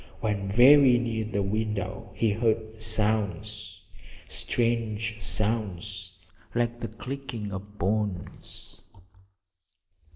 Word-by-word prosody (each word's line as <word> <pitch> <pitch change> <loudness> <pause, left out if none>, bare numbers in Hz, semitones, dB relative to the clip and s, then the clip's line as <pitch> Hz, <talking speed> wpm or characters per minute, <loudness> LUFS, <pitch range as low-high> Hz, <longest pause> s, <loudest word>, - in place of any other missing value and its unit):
When 105 -3 -1
very 125 +4 +7
near 115 -2 -1
the 100 -2 -1
window 100 -2 -2
he 110 0 +2
heard 110 0 0
sounds 105 -1 -1 0.5
strange 110 -2 -1
sounds 100 -4 -2 0.4
like 120 0 0
the 115 - -3
clicking 125 -1 -6
of 100 +2 -7
bones! 100 -1 -3
110 Hz, 90 wpm, -27 LUFS, 100-115 Hz, 0.5 s, very